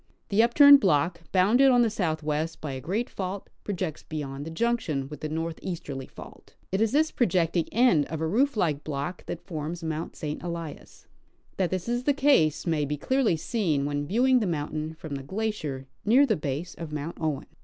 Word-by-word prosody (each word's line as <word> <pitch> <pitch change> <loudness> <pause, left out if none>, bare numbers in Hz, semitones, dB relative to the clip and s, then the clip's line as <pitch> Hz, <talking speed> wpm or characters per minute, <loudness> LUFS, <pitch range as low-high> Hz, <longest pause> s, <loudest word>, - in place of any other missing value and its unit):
The 205 +2 +4
upturned 285 +4 +8
block, 170 - +1
bounded 220 +9 +5
on 245 -2 +5
the 230 - +2
southwest 155 -5 -2
by 150 - -5
a 130 -1 -5
great 210 - -1
fault, 190 -2 -5
projects 185 -6 -3
beyond 145 -2 -6
the - - -4
junction 165 - -1
with 150 -2 -8
the 155 - -3
northeasterly 160 -3 -4
fault. - - -13 0.2
It 190 +2 0
is 225 - +2
this 310 +3 +2
projecting 175 -6 +1
end 220 - +4
of 160 - -5
a 160 - -1
roof 240 - +1
like 150 -7 0
block 155 +4 -4
that 170 - -6
forms 165 0 -5
Mount 160 0 -4
St. 150 -1 -5
Elias. 170 -3 -7 0.5
That 185 -3 +1
this 185 +1 -3
is 240 +1 -1
the 285 - +4
case 270 - +3
may 160 -4 +1
be 145 +1 -2
clearly 250 - +1
seen 160 -7 0
when 145 0 -2
viewing 250 - +3
the 215 - -1
mountain 155 -1 -3
from 155 -2 -8
the 135 - -4
glacier 155 -7 -3 0.2
near 250 +7 +5
the 225 -6 +2
base 150 +3 -4
of 165 -2 -8
Mount 150 +2 -5
Owen. 155 -4 -1
170 Hz, 190 wpm, -27 LUFS, 150-220 Hz, 0.5 s, upturned